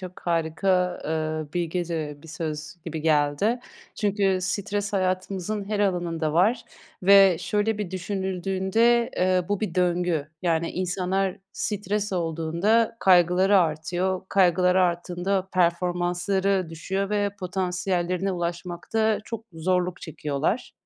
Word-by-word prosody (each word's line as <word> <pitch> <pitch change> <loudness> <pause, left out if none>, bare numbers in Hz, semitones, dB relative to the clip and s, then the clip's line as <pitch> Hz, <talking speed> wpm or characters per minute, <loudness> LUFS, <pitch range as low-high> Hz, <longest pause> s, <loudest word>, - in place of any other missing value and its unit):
çok 185 -1 -9
harika, 175 +2 0
eee, 155 -1 -2
bilgece 165 -4 -3
bir 165 - -13
söz 155 0 -5
gibi 160 -2 -4
geldi. 155 +9 +2 0.3
Çünkü 200 -3 +1
stres 200 +2 -2
hayatımızın 190 +1 -1
her 210 -1 -1
alanında 175 -5 0
var 220 +9 +2 0.4
ve 195 -2 +7
şöyle 205 +4 0
bir 205 -4 -3
düşünüldüğünde, 190 +5 0
eee, 185 0 +2
bu 205 0 -1
bir 205 -6 -3
döngü. 175 -4 +1
Yani, 165 -2 +1
insanlar 185 +1 -1 0.2
stres 210 0 -2
olduğunda 170 +7 +1
kaygıları 185 +1 +5
artıyor. 175 +3 0
Kaygıları 180 0 +4
arttığında 180 +2 -1
performansları 180 +2 +1
düşüyor 195 +5 -3
ve 205 -1 +1
potansiyellerine 180 0 -1
ulaşmakta 175 +5 -1
çok 225 -1 -6
zorluk 180 +2 -1
çekiyorlar. 155 - -2
180 Hz, 110 wpm, -25 LUFS, 170-195 Hz, 0.4 s, ve